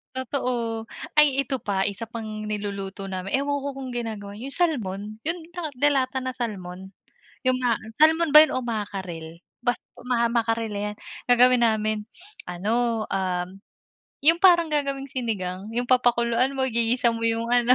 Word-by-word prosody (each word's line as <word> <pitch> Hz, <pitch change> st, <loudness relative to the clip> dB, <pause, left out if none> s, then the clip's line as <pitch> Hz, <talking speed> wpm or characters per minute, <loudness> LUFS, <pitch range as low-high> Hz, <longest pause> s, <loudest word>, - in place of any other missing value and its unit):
Totoo, 240 Hz, -4 st, -2 dB, 0.3 s
ay 280 Hz, -2 st, +5 dB
ito 265 Hz, 0 st, -3 dB
pa 195 Hz, -3 st, -1 dB
isa 205 Hz, +3 st, -3 dB
pang 215 Hz, -2 st, -6 dB
niluluto 200 Hz, -2 st, -4 dB
namin. 190 Hz, 0 st, -4 dB
Ewan 285 Hz, +1 st, 0 dB
ko -, -, -3 dB
kung 265 Hz, -1 st, -6 dB
ginagawa 220 Hz, -4 st, -4 dB
nyo 240 Hz, -, -7 dB
yung 275 Hz, -, 0 dB
Salmon? 240 Hz, -, 0 dB, 0.3 s
Yung 340 Hz, +2 st, 0 dB, 0.4 s
delata 265 Hz, -2 st, +2 dB
na 255 Hz, -, -2 dB
Salmon? 190 Hz, -6 st, -6 dB, 0.6 s
Yung 255 Hz, -, +4 dB
ma 240 Hz, -3 st, +1 dB, 0.2 s
Salmon 320 Hz, +2 st, +4 dB
ba 305 Hz, -, +13 dB
yun 315 Hz, -, -2 dB
o -, -, +1 dB
Mackerel? 190 Hz, -8 st, -5 dB, 0.2 s
Basta 245 Hz, -, 0 dB, 0.5 s
Mackerel 230 Hz, -1 st, 0 dB
yan, 210 Hz, 0 st, -3 dB, 0.3 s
gagawin 245 Hz, 0 st, +5 dB
namin 215 Hz, -1 st, 0 dB, 0.4 s
ano 220 Hz, +6 st, 0 dB
ah, 185 Hz, -2 st, 0 dB, 0.8 s
yung 330 Hz, +3 st, +6 dB
parang 345 Hz, -3 st, +6 dB
gagawing 275 Hz, -2 st, -1 dB
sinigang 200 Hz, -6 st, -3 dB
yung 245 Hz, -, +1 dB
papakuluan 240 Hz, 0 st, +3 dB
mo, 265 Hz, -, 0 dB
igigisa 235 Hz, 0 st, +2 dB
mo 230 Hz, 0 st, -4 dB
yung 230 Hz, 0 st, 0 dB
ano? 245 Hz, +1 st, +5 dB
235 Hz, 150 wpm, -25 LUFS, 205-260 Hz, 0.8 s, ba